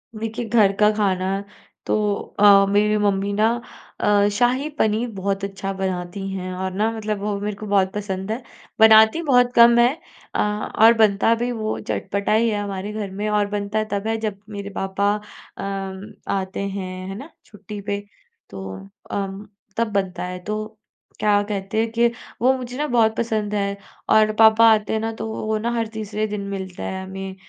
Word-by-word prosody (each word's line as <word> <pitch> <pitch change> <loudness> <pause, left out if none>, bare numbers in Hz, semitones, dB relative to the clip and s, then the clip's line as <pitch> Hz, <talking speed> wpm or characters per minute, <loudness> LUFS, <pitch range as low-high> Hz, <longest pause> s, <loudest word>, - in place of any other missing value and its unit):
देखिए 225 +2 -4
घर 210 -4 +5
का 210 0 +6
खाना 190 -3 0 0.6
तो - - +1 0.4
अ, 200 -1 +7
मेरी 210 +1 +3
मम्मी 200 -1 +1
ना 215 +2 +3 0.5
अ, 205 0 +3
शाही 255 +5 +2
पनीर 220 +3 +1
बहुत 195 +1 -2
अच्छा 195 0 -4
बनाती 190 0 -3
हैं 185 -1 -4
और 190 +1 -3
ना 215 +3 +1
मतलब 215 -2 -3
वो 205 0 -2
मेरे 205 0 -3
को 215 - -7
बहुत 195 -2 +2
पसंद 195 -1 -4
है। 240 +3 -3 0.4
बनाती 220 +7 +7
बहुत 245 -3 +3
कम 235 0 +7
हैं, 245 +5 +4 0.4
अ, - - 0 0.4
और 230 +1 +9
बनता 215 +1 +4
भी 240 +2 -2
वो 220 -2 -2
चटपटा 200 - -2
ही 230 +1 +3
है 210 -1 -1
हमारे 200 +1 -4
घर 205 -3 -4
में 205 +2 -3
और 210 -1 +2
बनता 205 +1 -1
तब 200 +2 -2
है 225 0 0
जब 200 -1 -5
मेरे 200 -1 -6
पापा 200 +1 0 0.4
अ, - - -6 0.7
आते 190 -1 -3
हैं 185 -1 -5
है 195 - -5
ना? 280 +7 -9 0.2
छुट्टी 210 0 -9
पे, 200 0 -2 0.5
तो 95 0 -8 0.2
अम, 200 +1 -4 0.3
तब 230 -2 0
बनता 190 -3 -1
है। 180 0 -5
तो 215 +2 -4 0.5
क्या 205 -1 +3
कहते 205 +1 -3
हैं 225 0 -2
कि 235 +1 +3 0.3
वो 255 +2 +5
मुझे 250 0 -7
ना 300 - 0
बहुत 230 -3 +3
पसंद 215 -3 -1
है 200 0 -1 0.3
और 215 0 +5
पापा 220 +1 +7
आते 210 0 -1
हैं 220 - +1
ना 225 +1 -2
तो - - -3
वो 220 - -5
वो 215 0 0
ना 235 +2 -1
हर 225 -1 0
तीसरे 215 0 -3
दिन 210 -1 -4
मिलता 190 -2 -6
है 190 0 -4
हमें। 190 0 -7
210 Hz, 185 wpm, -22 LUFS, 195-220 Hz, 0.7 s, और